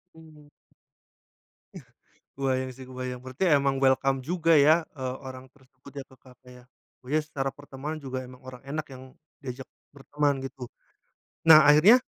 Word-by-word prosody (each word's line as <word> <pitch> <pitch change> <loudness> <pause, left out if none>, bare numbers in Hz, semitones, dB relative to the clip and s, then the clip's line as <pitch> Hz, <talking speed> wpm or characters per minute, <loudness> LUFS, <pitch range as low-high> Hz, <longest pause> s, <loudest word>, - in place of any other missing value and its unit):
Hmm. 155 -2 -17 1.3
Eh, - - -10 0.5
kebayang 130 -1 -1
sih 130 - -10
kebayang, 130 -1 -6
berarti 130 +7 -3
emang 140 -1 +1
welcome 135 0 +2
juga 165 +1 +1
ya, 150 +2 +6 0.2
eee, 130 -2 -4
orang 130 0 -9
tersebut 130 0 -19
ya 135 - -6
ke 130 - -19
kafe 125 0 -19 0.2
yah. - - -30 0.4
Oh - - -14
ya 155 - +3
secara 145 -3 -4
pertemuan 145 +2 -7
juga 130 -2 -5
emang 125 0 -13
orang 125 -1 -10
enak 150 +2 -5
yang 130 - -11 0.4
diajak 130 0 -7 0.3
berteman 145 +1 -1
gitu. 135 -1 -7 0.8
Nah 155 -1 +9
akhirnya 180 +13 +7
135 Hz, 155 wpm, -26 LUFS, 130-150 Hz, 1.3 s, Nah